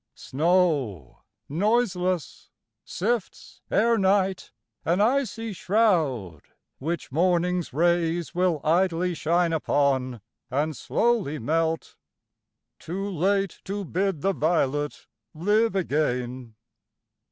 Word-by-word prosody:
Snow 145 - 0 0.3
noiseless 185 - 0 0.3
sifts 220 +2 -3
Ere 230 +2 +3
night, 190 -1 +1 0.3
an 175 +3 +1
icy 230 -1 0
shroud, 160 - +1 0.4
which 160 +1 -4
morning's 180 +2 +1
rays 170 +2 +1
Willidly 175 +1 +1
shine 170 +2 +1
upon 135 -6 0 0.3
and 150 +4 -1
slowly 220 - 0
melt, 160 +5 -1 0.8
Too 195 +4 -4
late 195 +1 0
to 200 +1 -4
bid 185 -2 -1
the 195 +4 +1
violet 150 -4 0 0.3
live 210 +6 +2
again. 125 - -1
175 Hz, 85 wpm, -25 LUFS, 150-195 Hz, 0.8 s, Ere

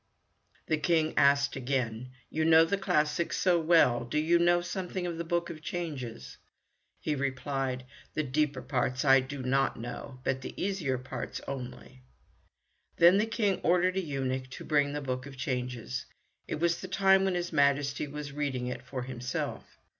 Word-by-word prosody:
The 155 - 0
King 160 -1 +2
asked 140 0 +4
again, 125 -3 -2 0.2
"You 155 - 0
know 160 0 +7
the 180 - 0
classics 155 -4 0
so 180 -2 +3
well, 160 -8 +4
do 120 +5 -3
you 165 +3 +3
know 175 0 +4
something 180 0 -4
also 175 - -1
of 165 - -6
the - - -1
Book 170 +1 -1
of 155 -2 -9
Changes?" 150 - -5 0.6
He 155 - -1
replied, 135 -2 -2 0.3
"The 155 - +1
deeper 145 -1 0
parts 130 0 -1
I 135 -1 +7
do 130 +1 -5
not 135 0 +1
know, 125 +2 -7
but 130 0 -1
the - - -8
easier 180 -10 -1
parts 130 +1 -6
only." 130 -1 -7 1.0
Then 175 +4 +7
the 215 - +1
King 210 -4 0
ordered 180 +1 +3
a 190 - +1
eunuch 130 -4 -3
to - - -9
bring 145 -1 +2
the 145 - -3
Book 130 -1 -3
of 135 -1 -11
Changes. 125 - -3 0.4
It - - -2
was 170 +2 0
the 185 - -5
time 195 +1 +4
when 190 -1 +1
his 175 -1 -3
Majesty 140 0 +2
was 145 0 -6
reading 140 -3 -2
it 125 -1 -4
for 125 0 -5
himself. 125 0 -5
145 Hz, 175 wpm, -30 LUFS, 130-170 Hz, 1.0 s, know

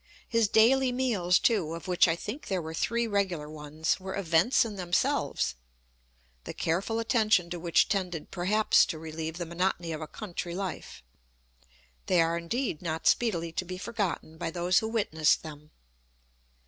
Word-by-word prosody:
His 230 -2 +2
daily 250 +5 +4
meals, 220 -9 +2
too, 180 -9 +1
of 165 - -9
which 180 0 +4
I 165 - +1
think 265 - -7
there 190 -3 0
were 160 -1 -6
three 235 +7 0
regular 195 -8 -1
ones, 155 +2 -2
were 190 0 -6
events 180 +6 +3
in 215 -2 -6
themselves, 175 -2 0 0.9
the - - -7
careful 185 +7 -1
attention 220 -6 +2
to 175 - -4
which 170 0 +3
tended 180 -6 -3
perhaps 205 +4 +3
to 165 - -4
relieve 160 +1 -5
the 175 - -3
monotony 170 0 -1
of 155 0 -4
a 155 - -5
country 175 -2 -6
life: 190 - -6 1.0
they 180 - +3
are 165 0 +3
indeed 170 - -2
not 160 -2 -4
speedily 170 -8 +2
to 170 - -2
be 180 +1 -6
forgotten 185 -6 -3
by 165 - -2
those 175 +2 +2
who 220 - -3
witnessed 180 -9 +1
them. 150 -1 -10
180 Hz, 160 wpm, -28 LUFS, 165-215 Hz, 1.0 s, daily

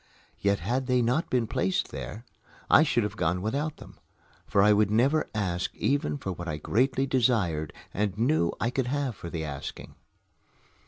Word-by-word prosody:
Yet 100 -2 +1
had 125 +8 -1
they 125 -2 +3
not 125 +8 +1
been 125 -2 +1
placed 190 - 0
there, 110 +4 -7 0.5
I - - +8
should 135 -7 +2
have 105 0 -3
gone 85 -1 0
without 140 +10 -2
them, - - -14 0.5
for 100 - +3
I 105 +1 +6
would 105 -1 +3
never 135 +9 +2
ask 90 -4 -1
even 145 +5 0
for 95 -9 -4
what 85 0 -6
I 75 -2 -2
greatly 130 - +1
desired 110 - +1 0.2
and 100 -1 -1
knew 120 - +2
I 115 +4 0
could 130 -1 -1
have 140 -3 -1
for 85 -1 -8
the 80 -1 -4
asking. 70 -3 -7
110 Hz, 175 wpm, -28 LUFS, 95-130 Hz, 0.5 s, I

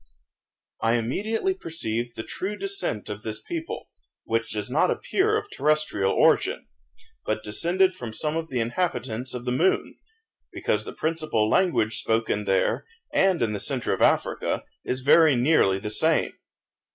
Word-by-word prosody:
I 115 0 +2
immediately 215 - -1
perceived 120 - -3
the 110 - -5
true 200 - -4
descent 390 - -1
of 105 0 -5
this 110 -1 -3
people, 330 -1 -6 0.3
which - - -1
does - - -3
not - - +2
appear 430 +3 +1
of 430 -1 -4
terrestrial 155 - +1
origin, - - +2 0.6
but 110 0 -2
descended 180 - +1
from 120 -8 -7
some 150 +7 -1
of 165 0 -3
the 125 - -2
inhabitants 125 -2 -2
of 125 0 -6
the 125 - -1
moon, 165 +10 +1 0.5
because - - -1
the - - -6
principal 155 -9 0
language 115 - +2
spoken 110 -2 0
there, 95 -1 +1 0.3
and 190 -7 +3
in 110 -2 0
the 105 - -3
centre 130 +3 0
of - - -3
Africa, - - +1 0.2
is 130 +1 -2
very 150 +2 +6
nearly 120 -7 +3
the 105 +2 -4
same. 160 +8 +2
130 Hz, 150 wpm, -25 LUFS, 110-175 Hz, 0.6 s, very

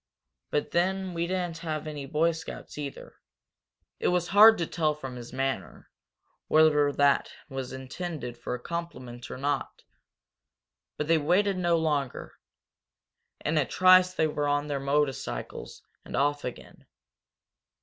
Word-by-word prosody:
But 150 - -1
then 190 +1 0
we 170 0 -1
didn't 175 -2 -2
have 155 -2 -4
any 150 -3 -6
Boy 160 +4 +2
Scouts, 160 -1 -8
either!" 145 -2 -7 0.8
It - - 0
was 180 -1 +1
hard 220 +3 +8
to 170 - -1
tell 155 -2 0
from 135 -4 -7
his 120 -1 -9
manner 135 +1 -4 0.6
whether 150 -2 +4
that 140 0 +2 0.2
was 135 -2 -5
intended 130 -1 -6
for 120 - -4
a - - -7
compliment 125 -7 -6
or - - -6
not. 140 0 -2 1.1
But 150 - -2
they 165 0 +4
waited 185 +5 +2
no 175 -2 +2
longer. 145 -5 -2 1.1
In 155 +1 +2
a 140 - +2
trice 185 0 +6
they 160 - +2
were 150 -1 -1
on 145 0 +1
their 140 -1 -1
motorcycles 140 - -2 0.2
and - - -7
off 145 +1 +1
again. 125 - -9
150 Hz, 140 wpm, -28 LUFS, 140-170 Hz, 1.1 s, hard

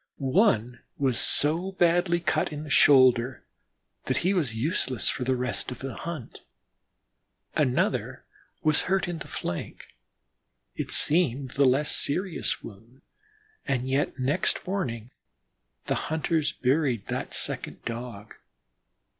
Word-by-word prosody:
One 130 - +2 0.2
was 130 -4 +1
so 170 +6 +2
badly 175 -1 +2
cut 170 - 0
in 150 0 -5
the 150 - -8
shoulder 130 -4 +5 0.6
that - - 0
he 190 - +3
was 145 - 0
useless 130 - -1
for 125 - -2
the 130 +1 +1
rest 125 -4 -2
of 125 - -6
the 135 -1 -6
hunt. 160 -8 -7 1.2
Another 130 -4 0 0.4
was 155 -1 +3
hurt 190 -1 +1
in 175 -2 -4
the - - -8
flank 85 - -6 0.9
it - - -4
seemed 140 -5 +2
the 140 +1 +3
less 135 +3 +3
serious 180 +4 -1
wound, 115 +5 -13 0.6
and 130 -2 -1
yet 135 +2 0
next 140 +7 +1
morning 125 - -3 0.7
the - - 0 0.2
hunters 155 -1 0
buried 130 -4 0
that - - -3
second - - -4
Dog. 115 -3 -6
140 Hz, 125 wpm, -27 LUFS, 125-165 Hz, 1.2 s, shoulder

